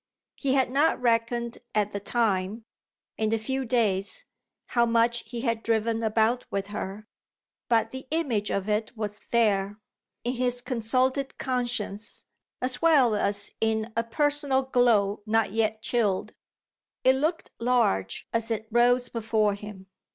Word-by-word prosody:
He 270 -2 0
had 260 -2 +2
not 285 +2 +3
reckoned 235 0 0 0.2
at 210 -1 +1
the 200 - -3
time, 210 -1 0 0.5
in 220 -1 +1
the 225 - +2
few 265 +4 -2
days, 225 - 0 0.4
how 235 - +2
much 235 +1 +2
he 235 +1 -5
had 230 -3 0
driven 225 0 0
about 225 +2 +2
with 200 0 -3
her; 205 +2 -5 0.6
but 230 -2 +2
the 260 0 -8
image 265 -11 0
of 200 0 -1
it 215 +2 -1
was 210 -1 -4
there, 205 -3 +2 0.5
in 245 - -1
his 245 -1 0
consulted 255 +3 0
conscience, 240 -5 -2 0.4
as 255 0 +1
well 285 -9 +5
as 205 -1 +1
in 220 0 0
a 230 - +1
personal 285 +2 +1
glow 230 -6 +2
not 225 -1 +2
yet 220 0 0
chilled: 210 -6 0 0.7
it 260 - +6
looked 310 +5 -1
large 230 - +1
as 230 0 -1
it 220 -1 -2
rose 245 +1 +4
before 220 -3 +1
him. 205 -1 -9
230 Hz, 145 wpm, -27 LUFS, 215-250 Hz, 0.7 s, it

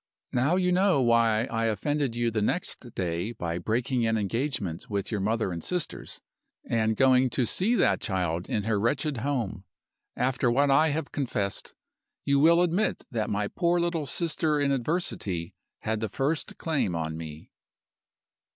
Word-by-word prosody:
Now 130 +8 +2
you 180 -1 +2
know 185 -3 +3
why 115 -3 +3
I 115 -3 -1
offended 130 +4 0
you 120 -1 0
the 110 -1 -1
next 120 -1 -2
day 90 +5 -2
by 85 -5 -3
breaking 120 +5 0
an 110 0 +2
engagement 105 - -2
with 100 0 -2
your 105 -3 -1
mother 110 -1 0
and 85 -1 -5
sisters, 180 -3 -3 0.5
and 110 -1 +1
going 130 -1 +5
to 125 0 0
see 200 - +1
that - - +2
child 90 -3 -2
in 105 - 0
her 105 -1 +1
wretched 135 +6 0
home. 115 -7 -2 0.5
After 125 0 +1
what 140 +4 +3
I 155 +4 +5
have 150 0 -2
confessed, 105 -8 -3 0.5
you 140 0 +3
will 170 +4 +6
admit 180 +5 0
that 110 -3 -1
my 105 0 0
poor 175 - +1
little 170 -4 -1
sister 155 -2 0
in 140 -1 +2
adversity 120 - -2 0.3
had 110 0 -1
the 110 -1 -2
first 140 +8 -2
claim 145 - 0
on 80 -1 -2
me. 80 -1 -8
120 Hz, 160 wpm, -27 LUFS, 105-145 Hz, 0.5 s, will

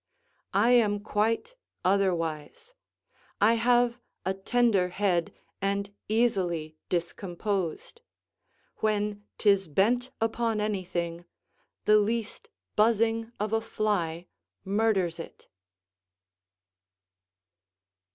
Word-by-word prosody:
I 220 +5 +4
am 210 -4 +4
quite 225 - 0 0.3
otherwise; 185 - 0 0.7
I 215 +3 +5
have 240 +1 +2 0.2
a 190 - +1
tender 195 -1 +2
head 180 -3 0 0.3
and 200 +1 -1 0.2
easily 180 -9 0
discomposed; 180 - -3 0.8
when 210 -1 -1
'tis 200 -3 +3
bent 235 - +2
upon 225 0 0
anything, 175 -5 -2 0.6
the 215 0 +6
least 225 +1 -2 0.3
buzzing 225 +1 +2
of 210 +1 -2
a 225 - +2
fly 195 -7 -1 0.4
murders 195 -4 +1
it. 165 - -10
205 Hz, 85 wpm, -28 LUFS, 185-225 Hz, 0.8 s, the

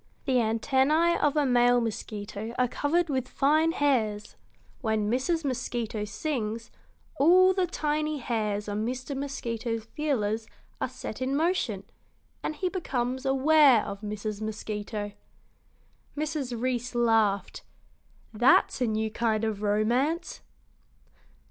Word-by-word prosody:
The 265 -3 +2
antennæ 265 +9 +2
of 295 0 +2
a 295 - +3
male 245 -1 +4
mosquito 215 0 -5
are 250 - +3
covered 325 +7 0
with 260 -4 -1
fine 310 +5 +2
hairs. 225 -9 0 0.4
When 220 -3 0
Mrs. 305 +6 0
Mosquito 240 -4 -2
sings, 230 -2 -3 0.5
all 365 +6 +6
the 370 -1 +1
tiny 305 -2 -1
hairs 215 -5 -2
on 205 +1 -2
Mr. 255 +4 -4
Mosquito's 235 -5 -3
feelers 225 -5 -1 0.3
are - - 0
set - - -7
in 265 +2 0
motion, 295 - 0 0.6
and 310 - -3
he 365 +5 -1
becomes 260 -8 -2
aware 270 -2 +5
of 200 -1 -6
Mrs. 210 0 -4
Mosquito." 210 -1 -4 1.1
Mrs. 285 -6 -2
Reece 245 0 -2
laughed. 220 -5 +2 0.7
"That's 245 +3 +4
a 250 - +2
new 220 0 -1
kind 220 -1 0
of 215 -2 -2
romance!" 240 - 0
245 Hz, 120 wpm, -27 LUFS, 220-290 Hz, 1.1 s, all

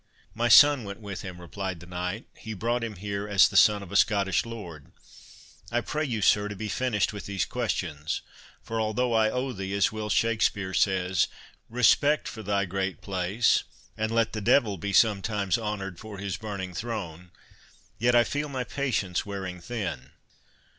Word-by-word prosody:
"My 120 +2 0
son 145 0 +7
went 100 +1 -7
with 100 -3 -6
him," 90 -2 -8
replied 95 +1 -5
the 85 - -11
knight; 90 +5 -4
"he 110 -1 -7
brought 120 +4 -1
him 110 -2 -4
here 100 +2 -4
as 100 -4 +6
the - - -9
son 105 -1 +5
of 90 - -11
a - - -5
Scottish 100 -1 +2
lord.—I 105 +3 -8
pray 150 +5 -2
you, 115 -8 -2
sir, 105 +2 +4
to 105 - -6
be 105 +2 -5
finished 110 -4 0
with 100 - -7
these 100 -3 -1
questions; 75 +1 -3 0.4
for 115 0 -2
although 115 +3 0
I 110 -1 +4
owe 125 +2 -2
thee, 95 -1 -4
as 100 - +3
Will 110 -1 -4
Shakspeare 105 -3 +1
says, 95 -3 +2 0.4
Respect 135 +5 +3
for 110 - -7
thy 100 -1 0
great 95 0 -3
place, 100 +4 +1 0.3
and 110 +1 -2
let 115 0 +1
the 110 - -3
devil 105 0 +3
Be 100 +4 -3
sometimes 105 0 +2
honoured 100 -4 -4
for 110 -2 -9
his 100 -1 -3
burning 100 -4 -5
throne,— 90 -6 -5 0.7
yet 120 +1 +3
I 120 - +7
feel 145 +4 -3
my 130 -2 -2
patience 120 -10 -1
wearing 95 -3 -5
thin." 100 - -5
105 Hz, 175 wpm, -27 LUFS, 95-115 Hz, 0.7 s, son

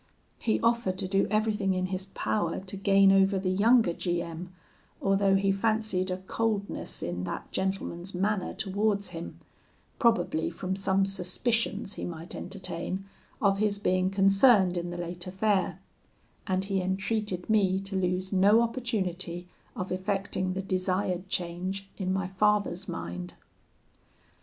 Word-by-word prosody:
He 220 - +1
offered 230 -5 +1
to 185 - -3
do 195 +1 +2
everything 210 -2 +1
in 185 0 0
his 185 +1 -3
power 210 +2 -1
to 190 +1 -7
gain 195 0 +5
over 195 0 +4
the 185 -1 0
younger 220 -1 +4
G 175 0 -1
M, 170 +1 -6 0.5
although 195 0 +3
he 195 0 +3
fancied 215 -2 0
a 185 - -1
coldness 200 +2 -2
in 90 +1 -3
that - - -5
gentleman's 190 -1 -3
manner 195 +1 0
towards 200 0 0
him, 170 -1 -7 0.6
probably 225 -9 +2
from 185 +2 -3
some 195 0 +2
suspicions 200 +3 0
he - - -5
might 165 0 -6
entertain 190 0 -4 0.4
of 195 -1 +3
his 210 -1 +1
being 185 -2 +1
concerned 195 0 +5
in 175 0 -2
the 175 - -5
late 175 +1 -5
affair; 195 +1 0 0.7
and 190 0 0
he 195 -1 0
entreated 190 0 -2
me 195 -4 +3
to 195 0 -5
lose 185 +1 0
no 205 +5 +5
opportunity 190 -8 -2 0.3
of 185 - -4
effecting 185 0 -1
the 190 +1 -3
desired 185 0 -1
change 185 +3 -3
in 185 -2 -2
my 190 0 0
father's 200 -1 +1
mind. 85 +1 -5
190 Hz, 140 wpm, -28 LUFS, 185-200 Hz, 0.7 s, gain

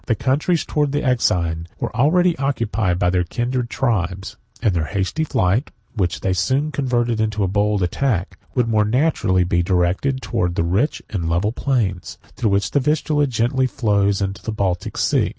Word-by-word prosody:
The 115 - +2
countries 150 - 0
towards 145 -2 0
the 145 - 0
Euxine 85 - +1
were - - -4
already 175 +6 +3
occupied 115 -9 0
by 90 -1 +2
their 90 -1 +2
kindred 120 +6 -2
tribes; 95 -8 -1 0.2
and 105 - +1
their 85 -3 0
hasty 100 - -1
flight, 105 - +1 0.2
which 95 -6 -1
they 95 - 0
soon 135 - 0
converted 120 -5 0
into 105 -1 0
a - - +2
bold 100 +1 +1
attack, 95 +1 -1 0.2
would 125 -3 +2
more 110 -2 +3
naturally 105 - +2
be 85 0 +1
directed 90 +9 +1
towards 90 -1 -1
the 85 - +1
rich 100 - 0
and 85 -5 -2
level 90 +6 +1
plains, 115 -9 -1 0.2
through 120 -3 0
which 100 0 +1
the 145 - +3
Vistula 150 +1 +1
gently 130 +2 +1
flows 100 -6 +1
into 95 0 -4
the 110 - -4
Baltic 95 -4 -2
Sea. - - +2
110 Hz, 175 wpm, -20 LUFS, 95-130 Hz, 0.2 s, already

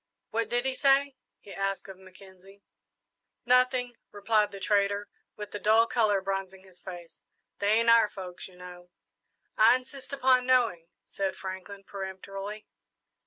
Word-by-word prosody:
"What 225 +1 -1
did 245 +1 0
he 265 - 0
say?" 275 0 +3 0.3
he 200 - -11
asked 195 0 -3
of 190 -1 -11
Mackenzie. 190 +1 -17 0.8
"Nothing," 250 -1 +2
replied 210 +1 +1
the 195 - -8
trader, 200 +1 +1 0.3
with 210 -1 -8
the 205 - -5
dull 220 +3 +4
colour 215 -4 +2
bronzing 190 -1 -4
his 185 -2 -18
face; 175 -2 -10 0.4
"they 205 +1 +2
ain't 230 +1 +2
our 230 -2 +6
folks, 185 -2 -8
you 185 - -18
know." 180 0 -12 0.7
"I 225 +3 +7
insist 260 +1 -8
upon 255 -2 +3
knowing," 230 -10 +2 0.2
said 195 -1 -3
Franklin, 190 +1 -8
peremptorily. 195 +2 -7
200 Hz, 145 wpm, -28 LUFS, 190-235 Hz, 0.8 s, I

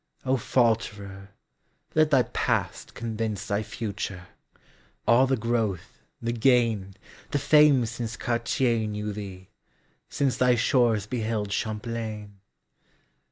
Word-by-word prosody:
O 130 0 +2
Falterer, 105 -6 0 0.7
let 155 -1 +4
thy 135 -4 +4
past - - -2
convinceThy 110 -2 -2
future: 100 -4 -5 0.8
all 125 +3 +5
the 135 0 +1
growth, 110 -5 -2 0.2
the 115 0 -2
gain, 115 -5 +2 0.3
The - - 0
fame 145 -2 +5
since 115 0 -5
Cartier 115 -1 0
knew 105 0 -4
thee, 95 -3 -8 0.6
sinceThy 125 -3 +2
shores 120 -4 +2
beheld 110 -3 -2
Champlain! 110 -1 -4
115 Hz, 100 wpm, -26 LUFS, 105-120 Hz, 0.8 s, all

